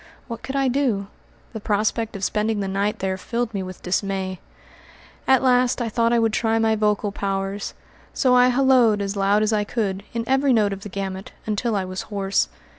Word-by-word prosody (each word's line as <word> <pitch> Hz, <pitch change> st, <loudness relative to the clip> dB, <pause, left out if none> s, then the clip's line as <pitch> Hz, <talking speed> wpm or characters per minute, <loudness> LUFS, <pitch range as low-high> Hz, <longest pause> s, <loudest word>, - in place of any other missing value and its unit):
What 230 Hz, -2 st, -6 dB
could 265 Hz, +1 st, -6 dB
I 275 Hz, -1 st, +2 dB
do? 245 Hz, -6 st, 0 dB, 0.5 s
The 220 Hz, -, -5 dB
prospect 215 Hz, +2 st, -1 dB
of 200 Hz, -, -6 dB
spending 215 Hz, +2 st, 0 dB
the 195 Hz, -, -2 dB
night 200 Hz, +2 st, -1 dB
there 190 Hz, 0 st, -2 dB
filled 235 Hz, +2 st, -3 dB
me 195 Hz, -, -2 dB
with 185 Hz, -1 st, -8 dB
dismay. 190 Hz, 0 st, -2 dB, 0.9 s
At 265 Hz, -1 st, +4 dB
last 250 Hz, -1 st, +3 dB
I 235 Hz, -2 st, -1 dB
thought 230 Hz, +1 st, +1 dB
I 240 Hz, -, +3 dB
would 225 Hz, -1 st, +2 dB
try 225 Hz, 0 st, +1 dB
my 225 Hz, -1 st, +2 dB
vocal 210 Hz, -1 st, 0 dB
powers; 195 Hz, 0 st, -3 dB, 0.4 s
so 255 Hz, -3 st, +2 dB
I 250 Hz, 0 st, +6 dB
hallooed 250 Hz, -4 st, +4 dB
as 200 Hz, 0 st, -2 dB
loud 200 Hz, +2 st, +2 dB
as 215 Hz, +1 st, +1 dB
I 210 Hz, -1 st, +2 dB
could, 200 Hz, -3 st, -2 dB
in 230 Hz, -1 st, -2 dB
every 265 Hz, +2 st, +3 dB
note 210 Hz, -3 st, +2 dB
of 195 Hz, -, -7 dB
the 205 Hz, -, -8 dB
gamut, 190 Hz, 0 st, -5 dB
until 220 Hz, +1 st, -1 dB
I 195 Hz, -2 st, -1 dB
was 185 Hz, 0 st, -5 dB
hoarse. 200 Hz, -1 st, 0 dB
210 Hz, 200 wpm, -23 LUFS, 195-235 Hz, 0.9 s, I